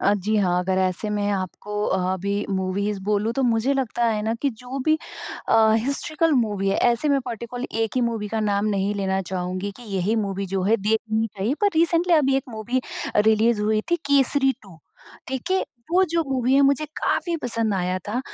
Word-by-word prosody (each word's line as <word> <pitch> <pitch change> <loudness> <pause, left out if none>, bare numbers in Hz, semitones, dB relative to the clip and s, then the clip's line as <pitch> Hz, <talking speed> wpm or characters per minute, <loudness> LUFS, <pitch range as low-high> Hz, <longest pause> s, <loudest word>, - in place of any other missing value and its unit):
अ, 200 - +3
जी 210 +2 -1
हाँ, 180 -3 +2
अगर 185 +1 0
ऐसे 185 +3 0
में 205 -1 -1
आपको 205 +2 -3
अभी 190 +2 -1
मूवीज़ 195 +2 -1
बोलूँ, 210 +2 0
तो 270 - -1
मुझे 235 +2 +2
लगता 240 -3 -1
है 215 -2 0
ना 225 +1 0
कि 280 - +2
जो 250 +3 -7
भी 315 0 +3 0.5
अ, - - +3 0.2
हिस्टोरिकल 305 +6 0
मूवी 200 -3 -2
है, 195 - +1
ऐसे 240 +5 +2
मैं 280 -1 +3
पर्टिकुलर 240 +2 -5 0.2
1 225 - -2
ही - - +3
मूवी 225 -3 -2
का 220 +1 -2
नाम 205 0 +1
नहीं 200 +1 0
लेना 190 -1 0
चाहूँगी 185 +2 -3
कि 245 - -13
यही 205 +5 +1
मूवी 195 0 -3
जो 190 0 -2
है, 215 +4 +3
देखनी 220 +1 0
चाहिए। 210 +5 -2
पर 410 - +4
रीसेंटली 335 +1 +3
अभी 275 -4 +3
एक 270 - -1
मूवी 235 +3 -2 0.4
रिलीज़ 220 +1 +3
हुई 215 0 +2
थी, 345 - +4
केसरी 280 -2 +3
2। 185 -5 -15 0.5
ठीक 265 +5 -4
है? 380 0 +2 0.3
वो 370 - +5
जो 335 -1 +2
मूवी 260 0 +1
है, 280 - +5
मुझे 280 +2 +3
काफ़ी 340 -1 0
पसंद 225 -3 0
आया 185 0 -1
था 240 +4 -1
220 Hz, 200 wpm, -23 LUFS, 200-260 Hz, 0.5 s, वो